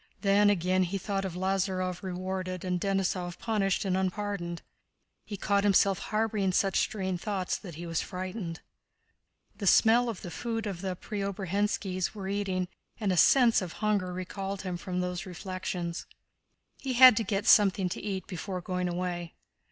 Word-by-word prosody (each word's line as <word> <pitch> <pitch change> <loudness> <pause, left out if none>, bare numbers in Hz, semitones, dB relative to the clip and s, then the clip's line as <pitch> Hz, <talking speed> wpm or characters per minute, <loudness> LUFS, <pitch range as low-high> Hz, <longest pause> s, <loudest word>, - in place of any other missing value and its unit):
Then 205 0 +4
again 185 -1 +2
he 185 +2 0
thought 195 0 -2
of 180 -3 -4
Lázarev 185 -1 -1
rewarded 185 0 -4
and 180 -1 -1
Denísov 185 -3 -1
punished 210 -3 0
and 185 -1 +1
unpardoned. 190 -2 -2 0.6
He 205 - -5
caught 200 +1 +1
himself 195 -1 +4
harboring 215 -3 0
such 195 0 +2
strange 190 -4 -1
thoughts 195 -4 -1
that 175 -7 -9
he 170 +2 -7
was 165 -1 -1
frightened. 185 -2 -5 1.0
The 200 - -2
smell 235 +5 +5
of 220 - -6
the 175 - -6
food 225 +1 -3
the 190 -2 -3
Preobrazhénskis 195 -1 -2
were 195 -2 -5
eating 190 -2 -1 0.3
and 205 -4 0
a - - +1
sense 235 - +5
of 180 -3 -5
hunger 205 -4 0
recalled 190 +2 -5
him 185 -2 -3
from 180 +1 -3
these 180 0 -3
reflections; 180 -1 -4 0.7
he 265 -2 -3
had 255 -1 +9
to 225 - +2
get 205 0 -1
something 200 -4 +5
to 180 - -5
eat 195 -2 -3
before 185 0 -5
going 180 0 -2
away. 175 -1 -3
190 Hz, 160 wpm, -29 LUFS, 180-205 Hz, 1.0 s, had